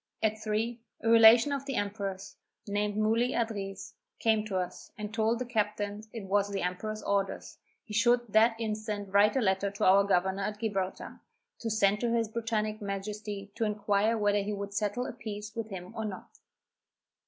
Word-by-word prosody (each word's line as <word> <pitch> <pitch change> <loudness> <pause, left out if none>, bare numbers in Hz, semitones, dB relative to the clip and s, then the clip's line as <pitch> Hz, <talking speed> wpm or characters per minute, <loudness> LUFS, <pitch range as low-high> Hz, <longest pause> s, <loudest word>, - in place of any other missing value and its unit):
At 220 0 +1
three, 220 +2 -1 0.2
a 225 - 0
relation 230 +3 +8
of 275 0 -3
the 270 - -2
emperor's, 200 -2 -3 0.3
named 205 0 -1
Muli 225 +4 +2
Adriz, 200 -4 -3 0.2
came 220 -2 +2
to 200 -3 -2
us, 180 -1 -5
and 210 0 -6
told 225 +1 +1
the 250 - -3
captain 210 -3 -1
it 225 -3 -6
was 200 +1 +1
the 200 -1 -2
emperor's 215 +4 -3
orders, 200 -1 -2 0.2
he 220 - -10
should 240 +2 +4
that 225 +1 +5
instant 215 -3 -3
write 205 +3 +5
a 265 - +2
letter 190 -1 +1
to 200 - -2
our 195 +2 +6
governor 190 0 +1
at 210 +1 -3
Gibraltar, 195 -4 -3 0.4
to 230 - -3
send 210 -1 +3
to 235 0 0
his 230 -2 +1
Britanic 215 -1 -2
Majesty 200 0 -5
to 230 - -2
inquire 210 +1 +1
whether 205 -1 +2
he 205 +1 -3
would 200 0 -5
settle 210 +4 -1
a - - -5
peace 215 -3 -7
with 225 -1 -4
him 185 +1 -7
or 220 - -3
not. 195 -3 -8
210 Hz, 180 wpm, -30 LUFS, 200-225 Hz, 0.4 s, relation